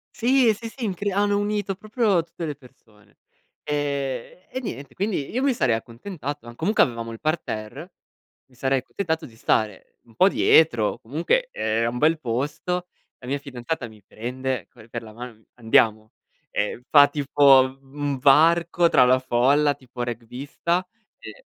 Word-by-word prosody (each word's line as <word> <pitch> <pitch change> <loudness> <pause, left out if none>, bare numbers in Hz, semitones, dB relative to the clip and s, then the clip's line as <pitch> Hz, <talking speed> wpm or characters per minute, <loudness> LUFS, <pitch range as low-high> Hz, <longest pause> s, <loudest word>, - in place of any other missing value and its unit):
Sì, 255 +1 +3
e 220 - +5
sì, 225 +2 -8
sì, 245 +2 -9
incre 205 0 -2
hanno 205 +1 +1
unito 205 -1 -1
proprio 210 -2 0
tutte 170 0 -7
le 150 - -3
persone. 115 -6 -22 0.5
Ehm, 140 0 -3
e 260 - -3
niente, 140 - -7
quindi 190 - -2
io 255 - -1
mi 275 -1 +2
sarei 130 - +2
accontentato 140 - -6
ma 120 - -9
comunque 205 - +3
avevamo 115 -2 -3
il 115 - -9
parterre, 155 - -4 0.5
mi 130 - -28
sarei 135 +2 +1
accontentato 160 +3 -3
di 115 -6 -15
stare 110 -3 -1
un 115 - -22
po' 185 - +5
dietro, 120 - +3
comunque 170 - 0
e - - -12
era 115 +1 +1
un 120 - -5
bel 155 +4 +3
posto, 150 +8 -3 0.3
la - - -14
mia 140 +2 -1
fidanzata 130 0 -5
mi 110 -2 -17
prende 125 -1 -4
co 115 -3 -17
per 115 0 -6
la 110 -1 -12
mano, 120 +2 -8
mi 110 0 -26
fa: - - -23
"Andiamo." 110 -1 +3 0.4
E 105 +4 -2
fa 145 -1 +8
tipo 140 -1 +5 0.2
un 135 +1 -20
un 140 -1 -1
varco 170 +5 +4
tra 125 - +5
la 130 +1 +5
folla, 135 +4 +2
tipo 125 -2 -8
rugbista 130 +10 -3 0.3
e - - -12
140 Hz, 170 wpm, -24 LUFS, 120-175 Hz, 0.5 s, fa